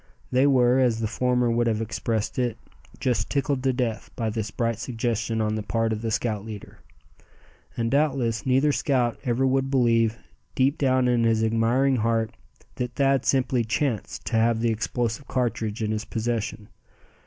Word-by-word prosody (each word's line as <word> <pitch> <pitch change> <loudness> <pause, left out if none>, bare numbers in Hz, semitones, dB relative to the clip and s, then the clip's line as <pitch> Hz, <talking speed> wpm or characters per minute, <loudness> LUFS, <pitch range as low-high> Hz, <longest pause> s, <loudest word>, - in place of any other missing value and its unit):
They 130 +3 +4
were, 125 -2 +4
as 125 -4 +3
the 115 - -1
former 125 +1 +1
would 120 0 +1
have 110 -2 +1
expressed 115 0 -2
it, 120 -3 0 0.4
"just 120 -5 0
tickled 140 -1 0
to 130 0 +2
death" 125 -4 -2
by 115 -2 -2
this 110 -1 -3
bright 115 +1 -2
suggestion 115 -2 -2
on 105 0 0
the 110 - -2
part 115 +1 0
of 110 - -4
the 115 - -2
scout 110 -2 -1
leader. 105 -2 -9 1.0
And 115 -1 -1
doubtless 135 -6 +1
neither 135 +3 +3
scout 130 -5 0
ever 125 +1 +1
would 135 0 +1
believe, 115 -4 +2 0.4
deep 135 +3 +2
down 130 -2 +2
in 120 -1 +2
his 115 -1 +2
admiring 115 +4 +2
heart, 115 0 0 0.5
that 125 -1 -3
Thad 135 -1 +2
simply 130 -2 +2
"chanced" 120 0 -2
to 115 - 0
have 115 0 +3
the 115 0 +1
explosive 115 +3 -2
cartridge 115 -3 -1
in 110 - -1
his 110 0 -2
possession. 110 -1 -3
115 Hz, 170 wpm, -25 LUFS, 110-130 Hz, 1.0 s, They